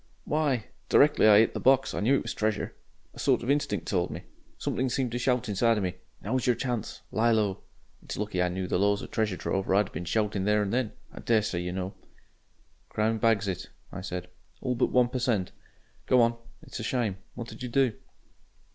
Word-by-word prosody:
"Why! 145 -7 0 0.2
Directly 145 -6 +5
I 105 -1 +8
'it 110 +1 +4
the - - -3
box 135 0 +3
I - - -2
knew 120 +7 +3
it - - 0
was - - -4
treasure. 110 -1 -1 0.4
A - - -13
sort - - +2
of 125 - +1
instinct 140 -8 0
told 90 -3 0
me. - - -7 0.3
Something 130 +1 -1
seemed 125 -1 -1
to 120 - -2
shout 125 0 +1
inside 110 +3 +2
of 105 - -1
me 90 -1 -1 0.3
'Now's 125 +5 -1
your 125 - +4
chance 120 -2 -3
lie 115 +2 +2
low.' 105 -4 +1 0.4
It's - - -6
lucky 105 -3 -1
I 90 - +2
knew 95 +1 -3
the 90 - 0
laws 100 +1 +2
of - - -9
treasure 105 -4 0
trove 95 0 -2
or 95 - +4
I'd 100 - +6
'ave 95 - -11
been 90 - -5
shoutin' 105 +1 0
there 105 0 +3
and 100 - -3
then. 125 -3 0 0.2
I - - -9
daresay 105 -6 +1
you 90 0 -3
know 95 +1 -4 0.5
" - - -38
"Crown 110 +1 0
bags 110 -2 +2
it," 95 -2 -4 0.2
I 95 - -6
said, 90 -1 -5 0.3
"all 125 - -1
but 120 - +2
one 125 -1 +4
per 130 - -2
cent. 115 -7 0 0.6
Go 130 - +5
on. 115 0 +2 0.3
It's - - -8
a - - -4
shame. 115 -5 -1 0.2
What 115 -1 -6
did 110 - -11
you 125 - -4
do?" 130 -1 +2
110 Hz, 225 wpm, -28 LUFS, 100-125 Hz, 0.6 s, I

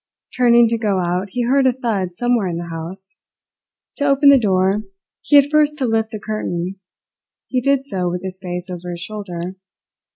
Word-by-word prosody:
Turning 240 -1 +5
to 230 0 -1
go 205 -4 0
out 180 +2 -1
he 245 - 0
heard 265 +2 +3
a - - +5
thud 210 -8 -2
somewhere 240 -2 +1
in 170 -2 -3
the 170 0 -6
house. 175 +4 -8 0.8
To 285 - 0
open 280 +1 +5
the 280 -1 +7
door, 195 -1 +2 0.4
he 290 - +2
had 285 0 +6
first 300 0 +3
to 270 - -1
lift 225 -1 0
the 215 -2 -6
curtain; 195 -4 -3 0.7
he 255 - -1
did 275 +1 +1
so 185 -8 -2
with 180 +1 -4
his 190 0 -6
face 180 -1 -5
over 180 -1 -7
his 175 -1 -5
shoulder. 185 -2 -6
205 Hz, 190 wpm, -19 LUFS, 180-245 Hz, 0.8 s, the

